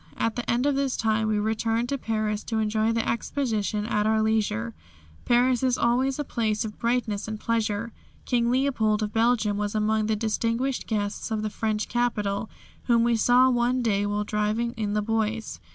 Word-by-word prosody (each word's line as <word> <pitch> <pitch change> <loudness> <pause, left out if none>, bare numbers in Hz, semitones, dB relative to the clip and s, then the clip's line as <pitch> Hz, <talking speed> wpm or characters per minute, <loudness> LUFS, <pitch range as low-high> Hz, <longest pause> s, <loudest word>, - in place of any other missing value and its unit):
At 225 -1 0
the 245 - -4
end 240 +3 +1
of 290 - +3
this 275 -1 0
time 220 -1 +1
we 215 -1 +1
returned 225 +2 0
to 280 - -1
Paris 215 -2 -2
to 225 - -2
enjoy 220 +1 +1
the 230 0 -1
Exposition 220 -4 -1
at 210 -2 0
our 220 0 +2
leisure. 205 - 0 0.5
Paris 245 0 +3
is 255 -1 +2
always 255 +3 +1
a 295 - -1
place 220 -5 -1
of 210 - -8
brightness 230 -4 -1
and 215 -1 -5
pleasure. 230 0 -1 0.3
King 235 -2 +1
Leopold 240 -5 +1
of 210 - -4
Belgium 225 -2 +2
was 210 0 -2
among 215 0 +1
the 220 - +1
distinguished 230 +4 -1
guests 205 -1 -2
of 215 -1 -2
the 215 - -2
French 215 -1 -2
capital, 220 -3 -1 0.4
whom 235 -2 +3
we 235 0 +3
saw 250 +3 +4
one 245 +1 +1
day 205 -3 +1
while 205 0 -1
driving 215 +3 -1
in 215 -4 -3
the 210 0 0
Bois. 225 0 -2
225 Hz, 185 wpm, -26 LUFS, 210-240 Hz, 0.5 s, saw